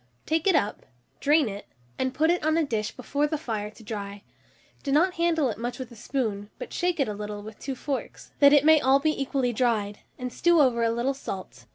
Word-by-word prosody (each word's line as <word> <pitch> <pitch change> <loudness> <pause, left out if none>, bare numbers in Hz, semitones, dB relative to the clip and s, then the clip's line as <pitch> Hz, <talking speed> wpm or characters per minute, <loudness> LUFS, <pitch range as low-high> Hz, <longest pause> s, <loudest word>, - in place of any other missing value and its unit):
Take 320 +3 0
it 380 - +5
up, 205 - -1 0.3
drain 295 -1 +3
it, 200 -1 -7 0.3
and 260 - 0
put 315 +5 +2
it 355 - 0
on 315 +1 +2
a 330 - +3
dish 220 -5 -1
before 285 +3 -1
the 310 +1 -2
fire 220 -8 -4
to 220 +1 -16
dry: 205 -2 -6 0.6
do 275 - -3
not 345 +6 +4
handle 335 -4 +2
it 210 - -8
much 240 +1 -3
with 260 -2 -7
a - - -11
spoon, 215 -4 -3
but - - -8
shake 355 -2 0
it - - +5
about 210 - -3
a 205 - -10
little 210 0 -5
with 215 0 -10
two 270 -1 -4
forks, 275 +1 -5
that 280 -1 +8
it 290 0 +5
may 315 -1 +7
all 265 +1 +4
be 310 +2 +2
equally 265 -2 0
dried, 215 -4 0 0.2
and 250 -1 -5
strew 345 -1 +3
over 250 -5 +4
a 230 - +3
little 235 +4 0
salt. 185 - -7
260 Hz, 235 wpm, -26 LUFS, 215-300 Hz, 0.6 s, that